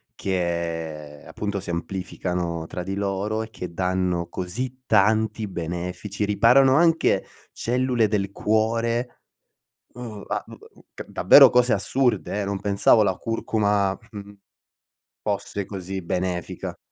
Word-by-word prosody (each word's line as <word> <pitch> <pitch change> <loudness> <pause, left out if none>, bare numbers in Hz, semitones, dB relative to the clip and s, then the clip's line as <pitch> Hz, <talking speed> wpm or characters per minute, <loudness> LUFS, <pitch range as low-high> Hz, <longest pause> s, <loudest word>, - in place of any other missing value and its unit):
che 85 -5 -3
appunto 100 -1 -3
si 95 - -9
amplificano 85 -1 -3
tra 90 - -5
di 95 +2 -4
loro 100 +2 -1
e 110 - -9
che 90 -5 -7
danno 90 -1 0
così 125 +10 -5
tanti 110 +1 +2
benefici, 90 +3 -4
riparano 125 +6 +5
anche 165 +1 +3 0.3
cellule 125 -1 +1
del 100 -2 -1
cuore, 115 +4 0 0.8
uhm, 115 -5 -8
a - - -2
u - - -12
a - - -9 0.2
u - - -20
ca - - -8
davvero - - +7
cose 125 -1 +3
assurde 120 0 0
eh, - - -1
non 100 0 -2
pensavo 100 +2 +4
la 95 -2 +1
curcuma, 105 -3 0
mhmm, 100 -2 -9 0.9
fosse 100 -1 -3
così 95 -1 -5
benefica. 90 0 -3
100 Hz, 130 wpm, -24 LUFS, 90-110 Hz, 0.9 s, davvero